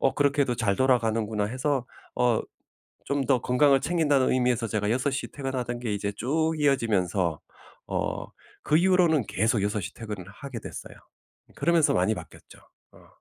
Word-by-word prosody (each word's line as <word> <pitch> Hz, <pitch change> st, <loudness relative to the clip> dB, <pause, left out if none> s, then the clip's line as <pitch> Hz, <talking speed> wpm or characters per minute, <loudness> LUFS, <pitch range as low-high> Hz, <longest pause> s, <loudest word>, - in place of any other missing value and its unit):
'어 135 Hz, -, +2 dB
그렇게도 140 Hz, -3 st, +1 dB
잘 100 Hz, -4 st, 0 dB
돌아가는구나.' 115 Hz, -5 st, +1 dB
해서 130 Hz, +2 st, -1 dB, 0.3 s
어 120 Hz, -3 st, +2 dB, 0.7 s
좀 140 Hz, -1 st, -1 dB
더 130 Hz, -2 st, +2 dB
건강을 135 Hz, +2 st, +3 dB
챙긴다는 145 Hz, -6 st, +2 dB
의미에서 125 Hz, -2 st, +1 dB
제가 105 Hz, 0 st, -1 dB
6 130 Hz, +3 st, +1 dB
시에 135 Hz, -, -3 dB
퇴근하던 130 Hz, -3 st, -3 dB
게 115 Hz, -4 st, -2 dB
이제 100 Hz, 0 st, -2 dB
쭉 160 Hz, +6 st, 0 dB
이어지면서 100 Hz, -, +1 dB, 0.5 s
어 -, -, -2 dB, 0.4 s
그 150 Hz, -, +3 dB
이후로는 175 Hz, -6 st, +3 dB
계속 110 Hz, -2 st, +1 dB
6 105 Hz, 0 st, -1 dB
시에 -, -, -5 dB
퇴근을 105 Hz, -5 st, -7 dB
하게 130 Hz, +1 st, -8 dB
됐어요. -, -, -9 dB, 0.6 s
그러면서 165 Hz, +1 st, +3 dB
많이 95 Hz, +4 st, +2 dB
바뀌었죠. -, -, -12 dB, 0.3 s
어. -, -, -18 dB
125 Hz, 335 characters per minute, -26 LUFS, 110-140 Hz, 0.7 s, 건강을